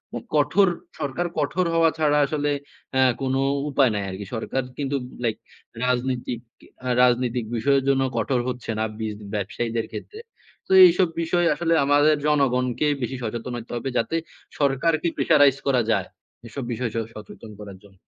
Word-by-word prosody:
উ -, -, -1 dB, 0.2 s
কঠোর 200 Hz, -1 st, +4 dB, 0.3 s
সরকার 150 Hz, +4 st, -2 dB
কঠোর 165 Hz, +5 st, 0 dB
হওয়া 165 Hz, -1 st, +4 dB
ছাড়া 150 Hz, -1 st, +3 dB
আসলে 145 Hz, 0 st, -1 dB, 0.4 s
অ্যা 130 Hz, 0 st, +4 dB, 0.2 s
কোন 130 Hz, -1 st, 0 dB, 0.4 s
উপায় 135 Hz, -4 st, +3 dB
নাই 100 Hz, -, -1 dB
আরকি। 95 Hz, +2 st, -6 dB
সরকার 130 Hz, +3 st, -2 dB
কিন্তু 140 Hz, -1 st, -2 dB, 0.3 s
লাইক 110 Hz, -2 st, 0 dB, 0.5 s
রাজনীতিক 125 Hz, -1 st, -1 dB, 0.6 s
রাজনৈতিক 125 Hz, -1 st, +2 dB
বিষয়ের 135 Hz, +4 st, +2 dB
জন্য 135 Hz, -1 st, +3 dB
কঠোর 130 Hz, -3 st, +1 dB
হচ্ছে 125 Hz, -2 st, -4 dB
না 110 Hz, -, +1 dB
বিজ 110 Hz, -1 st, -3 dB, 0.2 s
ব্যবসায়ীদের 110 Hz, +3 st, -2 dB
ক্ষেত্রে। 430 Hz, +1 st, -8 dB, 0.5 s
তো -, -, -8 dB
এইসব 180 Hz, +1 st, +4 dB
বিষয় 175 Hz, +1 st, +1 dB
আসলে 165 Hz, +2 st, 0 dB
আমাদের 145 Hz, +2 st, +4 dB
জনগণকে 130 Hz, -1 st, +1 dB
বেশি 130 Hz, +2 st, -3 dB
সচেতন 115 Hz, +2 st, -4 dB
হইতে 115 Hz, 0 st, -9 dB
হবে। 125 Hz, +3 st, -3 dB
যাতে 140 Hz, -, 0 dB, 0.4 s
সরকারকে 150 Hz, +4 st, +1 dB
প্রেশারাইজ 145 Hz, -4 st, +4 dB
করা 130 Hz, -3 st, +3 dB
যায়। -, -, 0 dB, 0.4 s
এসব 135 Hz, +3 st, -6 dB
বিষয় 120 Hz, -1 st, -2 dB
স -, -, -1 dB, 0.2 s
সচেতন 110 Hz, +1 st, -11 dB
করার 100 Hz, -2 st, -10 dB
জন্য। 95 Hz, -2 st, -20 dB
130 Hz, 150 wpm, -24 LUFS, 115-145 Hz, 0.6 s, কঠোর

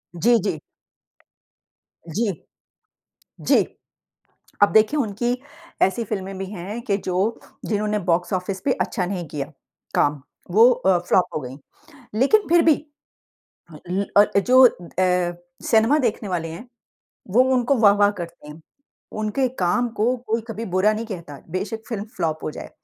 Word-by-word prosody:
जी, 235 Hz, +8 st, +4 dB
जी। 180 Hz, -5 st, -2 dB, 1.6 s
जी। 220 Hz, 0 st, +1 dB, 1.1 s
जी। -, -, +4 dB, 1.0 s
अब 205 Hz, -, +6 dB
देखिए 220 Hz, +8 st, +4 dB
उनकी 240 Hz, +1 st, -1 dB, 0.4 s
ऐसी 230 Hz, +5 st, +2 dB
फ़िल्में 195 Hz, -2 st, -5 dB
भी 195 Hz, -, -4 dB
हैं 205 Hz, +4 st, -6 dB
कि 205 Hz, -5 st, 0 dB
जो 185 Hz, -2 st, -4 dB, 0.5 s
जिन्होंने 210 Hz, 0 st, -1 dB
बॉक्स-ऑफिस 180 Hz, +2 st, -1 dB
पे 280 Hz, -, +3 dB
अच्छा 185 Hz, -5 st, -1 dB
नहीं 175 Hz, -2 st, -4 dB
किया 145 Hz, 0 st, -5 dB, 0.4 s
काम। 145 Hz, -1 st, +2 dB, 0.3 s
वो 225 Hz, +6 st, +7 dB
अ, 190 Hz, -7 st, +2 dB
फ्लॉप 180 Hz, +1 st, +2 dB
हो -, -, 0 dB
गई। 130 Hz, 0 st, -8 dB, 0.6 s
लेकिन 410 Hz, -, +4 dB
फिर 345 Hz, 0 st, +6 dB
भी 320 Hz, -2 st, +6 dB, 1.2 s
ल 195 Hz, +2 st, 0 dB
अ, 205 Hz, 0 st, +5 dB
जो 255 Hz, +6 st, +6 dB
अ, 180 Hz, -3 st, 0 dB, 0.3 s
सिनेमा 225 Hz, +7 st, +4 dB
देखने 230 Hz, -6 st, -1 dB
वाले 170 Hz, -3 st, -2 dB
हैं, 170 Hz, +10 st, -9 dB, 0.6 s
वो 235 Hz, +7 st, +5 dB
उनको 250 Hz, +2 st, +2 dB
वाह-वाह 205 Hz, -2 st, +5 dB
करते 170 Hz, -3 st, -9 dB
हैं। 150 Hz, +2 st, -11 dB, 0.6 s
उनके 215 Hz, +5 st, 0 dB
काम 210 Hz, +8 st, +1 dB
को 240 Hz, +4 st, +1 dB
कोई 225 Hz, +1 st, 0 dB
कभी 225 Hz, 0 st, -5 dB
बुरा 195 Hz, +3 st, +4 dB
नहीं 220 Hz, +1 st, -4 dB
कहता। 170 Hz, -9 st, -8 dB
बेशक 200 Hz, +5 st, -4 dB
फ़िल्म 210 Hz, -4 st, -4 dB
फ्लॉप 160 Hz, -3 st, -2 dB
हो -, -, -2 dB
जाए। -, -, -9 dB
205 Hz, 140 wpm, -22 LUFS, 180-230 Hz, 1.6 s, वो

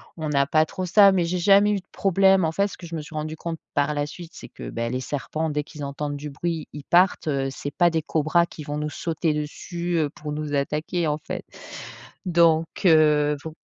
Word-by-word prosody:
on 155 Hz, -2 st, -4 dB
n'a 140 Hz, -1 st, +2 dB
pas 155 Hz, +2 st, +3 dB
trop 185 Hz, -, -4 dB
ça. 200 Hz, +2 st, +6 dB
Mais 180 Hz, -3 st, +1 dB
j'ai 180 Hz, +1 st, -1 dB
jamais 200 Hz, +3 st, +5 dB
eu 205 Hz, -, +1 dB
de 180 Hz, -, -20 dB
problème. 195 Hz, -1 st, +3 dB
En 160 Hz, -, 0 dB
fait, 200 Hz, +4 st, +1 dB
ce -, -, -10 dB
que 175 Hz, -, -10 dB
je 165 Hz, -, -10 dB
me 155 Hz, -, -3 dB
suis 155 Hz, +1 st, -11 dB
rendu 155 Hz, +1 st, -3 dB
compte 165 Hz, 0 st, -5 dB, 0.2 s
par 145 Hz, +1 st, +1 dB
la 145 Hz, 0 st, 0 dB
suite, 170 Hz, +3 st, -10 dB
c'est -, -, -10 dB
que, -, -, -9 dB
beh 115 Hz, 0 st, -3 dB
les 130 Hz, -, -1 dB
serpents, 150 Hz, +4 st, -3 dB
dès 150 Hz, 0 st, -1 dB
qu'ils 150 Hz, 0 st, -9 dB
entendent 145 Hz, +1 st, -4 dB
du 150 Hz, +1 st, -6 dB
bruit, 160 Hz, +2 st, -3 dB
ils 150 Hz, -, -9 dB
partent. 180 Hz, +1 st, +3 dB
Heu, 135 Hz, -2 st, 0 dB
c'est 145 Hz, +1 st, -6 dB
pas 175 Hz, -1 st, +4 dB
des 160 Hz, -2 st, -1 dB
cobras 160 Hz, +2 st, +2 dB
qui 160 Hz, -, -11 dB
vont 145 Hz, +1 st, -4 dB
nous 150 Hz, 0 st, -3 dB
sauter 160 Hz, 0 st, -1 dB
dessus, 170 Hz, +4 st, -4 dB
heu, 150 Hz, -3 st, +1 dB
pour 150 Hz, 0 st, -7 dB
nous 150 Hz, -1 st, -4 dB
attaquer, 155 Hz, +4 st, -1 dB
en 150 Hz, 0 st, 0 dB
fait. -, -, -6 dB, 0.8 s
Donc 165 Hz, -2 st, +4 dB, 0.2 s
heu, 150 Hz, -3 st, +5 dB
faut 160 Hz, -, -7 dB
155 Hz, 235 wpm, -24 LUFS, 150-175 Hz, 0.8 s, ça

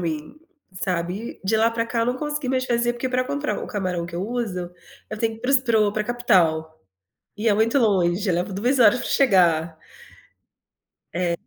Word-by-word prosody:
mim, 155 Hz, -, -4 dB, 0.4 s
sabe. 185 Hz, +3 st, -4 dB
E -, -, -9 dB
de 220 Hz, +3 st, +2 dB
lá 225 Hz, +1 st, +3 dB
para 230 Hz, 0 st, -2 dB
cá 230 Hz, -, -2 dB
eu 230 Hz, -, +1 dB
não 250 Hz, +1 st, 0 dB
consegui 295 Hz, -1 st, -3 dB
mais 255 Hz, -1 st, 0 dB
fazer, 240 Hz, -1 st, +1 dB
porque 240 Hz, +2 st, -3 dB
para 255 Hz, 0 st, 0 dB
comprar 285 Hz, +3 st, -3 dB
o -, -, -5 dB
camarão 185 Hz, -4 st, -3 dB
que 170 Hz, -, -10 dB
eu 180 Hz, +3 st, -3 dB
uso, 210 Hz, -7 st, -3 dB, 0.4 s
eu 215 Hz, -, -5 dB
tenho 225 Hz, 0 st, 0 dB
que -, -, -14 dB
ir -, -, -19 dB
para 250 Hz, -, -2 dB
os 275 Hz, -, +6 dB
para 235 Hz, -4 st, +1 dB
o 205 Hz, -1 st, +2 dB
pra 215 Hz, 0 st, -2 dB
capital. 175 Hz, -10 st, +1 dB, 0.6 s
E 225 Hz, +2 st, -1 dB
é 210 Hz, -, +5 dB
muito 225 Hz, +6 st, +2 dB
longe, 195 Hz, -3 st, +2 dB
leva 180 Hz, +3 st, -1 dB
2 245 Hz, +8 st, 0 dB
horas 235 Hz, +1 st, +6 dB
para -, -, -4 dB
chegar. 170 Hz, -, +3 dB, 1.4 s
É, 175 Hz, 0 st, 0 dB
215 Hz, 210 wpm, -23 LUFS, 180-240 Hz, 1.4 s, os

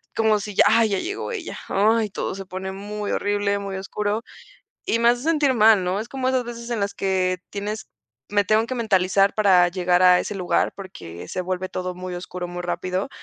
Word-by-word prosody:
como 220 Hz, -2 st, +3 dB
si: 205 Hz, -1 st, -7 dB
"Ya, -, -, +6 dB
ah, 225 Hz, +2 st, +5 dB
ya 200 Hz, -3 st, 0 dB
llegó 395 Hz, -, -4 dB
ella". 415 Hz, -7 st, -5 dB
Ay, 215 Hz, +2 st, +2 dB
todo 195 Hz, -, -3 dB
se 195 Hz, 0 st, -7 dB
pone 190 Hz, +1 st, -5 dB
muy 205 Hz, +1 st, -5 dB
horrible, 205 Hz, 0 st, 0 dB
muy 195 Hz, -1 st, -5 dB
oscuro, 210 Hz, +3 st, -2 dB, 0.6 s
y 230 Hz, -, 0 dB
me 235 Hz, -, +5 dB
hace 240 Hz, +1 st, +2 dB
sentir 300 Hz, -4 st, +3 dB
mal, 215 Hz, -3 st, +6 dB
¿no? 180 Hz, +2 st, -1 dB
Es 225 Hz, +2 st, -5 dB
como 260 Hz, -1 st, -2 dB
esas 260 Hz, -2 st, +1 dB
veces 235 Hz, 0 st, -7 dB
en 235 Hz, -, -1 dB
las 200 Hz, 0 st, -2 dB
que 185 Hz, -2 st, 0 dB
tienes 210 Hz, +1 st, -5 dB, 0.4 s
me 205 Hz, 0 st, +2 dB
tengo 215 Hz, +3 st, +3 dB
que 255 Hz, -, -4 dB
mentalizar 195 Hz, -3 st, +2 dB
para 190 Hz, -4 st, +5 dB
llegar 180 Hz, 0 st, +1 dB
a 180 Hz, 0 st, +7 dB
ese 210 Hz, -, -4 dB
lugar 180 Hz, -2 st, +1 dB
porque 135 Hz, -, -9 dB
se 185 Hz, -, -3 dB
vuelve 185 Hz, +1 st, -3 dB
todo 180 Hz, 0 st, -4 dB
muy 180 Hz, 0 st, -6 dB
oscuro, 180 Hz, 0 st, -6 dB
muy 175 Hz, 0 st, -5 dB
rápido, 180 Hz, +4 st, -2 dB
200 Hz, 210 wpm, -23 LUFS, 185-220 Hz, 0.6 s, a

